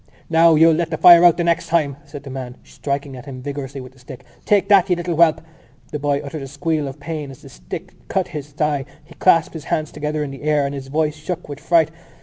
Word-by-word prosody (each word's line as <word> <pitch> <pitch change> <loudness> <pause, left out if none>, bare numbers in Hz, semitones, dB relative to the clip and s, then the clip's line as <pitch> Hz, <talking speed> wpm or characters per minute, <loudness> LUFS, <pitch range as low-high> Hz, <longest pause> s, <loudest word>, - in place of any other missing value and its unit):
"Now, 165 0 +5
you'll 165 +1 +6
let 165 +1 -1
the 160 - -3
fire 175 +1 +8
out 175 -2 +6
the 175 - 0
next 170 0 0
time!" 155 -5 0
said 145 -1 -10
the 140 - -9
man 130 -1 -7
striking 140 -1 -5
at 125 +1 -11
him 130 -2 -7
vigorously 140 -1 -6
with 125 0 -11
the 130 - -23
stick. 125 0 -11 0.2
"Take 205 -2 +3
that, 195 -2 +5
you 180 - +3
little 175 0 -3
whelp!" 160 -1 +4 0.5
The 150 - -4
boy 145 0 0
uttered 145 +1 -6
a 135 - -6
squeal 145 +2 -2
of 135 +2 -8
pain 150 -1 -5
as 135 - -13
the - - -12
stick - - -9
cut 190 -2 -1
his 150 -4 -6
thigh. 145 -1 -1 0.2
He - - -16
clasped 165 -3 +3
his 160 -3 -8
hands 155 -1 -2
together 150 0 -3
in 140 - -5
the 135 - -10
air 150 -1 +1
and 140 - -3
his 135 -1 -7
voice 150 +2 0
shook 160 +3 -6
with 145 -1 -8
fright. 165 -2 +2
150 Hz, 250 wpm, -20 LUFS, 140-165 Hz, 0.5 s, fire